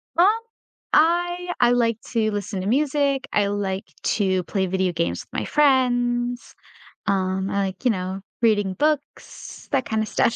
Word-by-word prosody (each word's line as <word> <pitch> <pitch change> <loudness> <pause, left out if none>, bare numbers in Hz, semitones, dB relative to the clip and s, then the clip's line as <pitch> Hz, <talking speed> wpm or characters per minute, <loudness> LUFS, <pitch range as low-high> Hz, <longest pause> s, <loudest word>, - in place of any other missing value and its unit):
Um, 345 - +6 0.7
I 350 +2 +2
I 245 -1 +5
like 230 -2 +2
to 220 -2 +1
listen 205 -1 -3
to 190 - -4
music. 280 +2 +1
I 205 -1 +3
like 200 -1 -2 0.2
to 190 -3 +1
play 190 +2 -1
video 190 0 0
games 170 0 -2
with - - -5
my - - -3
friends. 245 -4 +1 0.5
Um, 190 0 0
I 200 0 -1
like, 190 +7 -9
you 245 - +5
know, 190 -1 -4 0.2
reading 205 -4 +2
books, 300 +5 -3
that 265 -3 +1
kinda 220 0 -1
stuff. 230 +2 +1
225 Hz, 155 wpm, -23 LUFS, 195-265 Hz, 0.7 s, Um